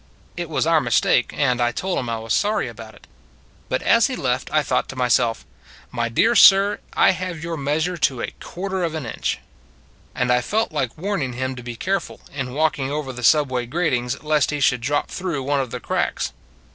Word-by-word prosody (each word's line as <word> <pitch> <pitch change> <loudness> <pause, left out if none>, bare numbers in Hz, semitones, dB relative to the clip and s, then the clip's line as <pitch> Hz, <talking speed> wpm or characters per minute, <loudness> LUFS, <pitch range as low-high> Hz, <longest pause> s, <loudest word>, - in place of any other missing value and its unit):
It 175 -2 -4
was 155 - 0
our 165 -1 +4
mistake, 120 0 +2
and 125 -4 +1
I 120 0 +2
told 185 +9 -2
him 125 - -4
I 115 - -1
was 110 0 -3
sorry 210 -7 +1
about 110 -1 -10
it: - - -18 0.6
but 130 - -1
as 230 0 +4
he 260 - -4
left 130 - -1
I 155 -1 +2
thought 125 -2 0
to - - -7
myself, 120 -2 +1 0.2
" - - -21
My 120 -1 -1
dear 225 - +3
sir, 200 -1 +7
I - - +5
have 180 -3 -5
your 165 0 -3
meas 150 +2 0
ure 180 0 -3
to 130 -6 +1
a - - -3
quarter 190 0 -4
of 165 -2 -2
an 155 -5 -4
inch." 110 - -2 0.8
And 125 -1 +1
I 125 0 +3
felt 220 - -1
like 140 -5 -2
warning 165 -8 -2
him 130 +1 -3
to 125 - -8
be 120 0 -7
care 195 +10 0
ful, - - -12
in 135 -2 -4
walking 150 -3 +1
over 145 -2 -3
the 125 - -8
subway 130 -2 +3
gratings, 125 -5 -1
lest 150 -3 +2
he 150 - -2
should 125 -3 +2
drop 145 +5 -1
through 170 -7 -3
one 140 +1 0
of 130 -2 -2
the - - -5
cracks. - - -2
140 Hz, 220 wpm, -22 LUFS, 125-170 Hz, 0.8 s, sir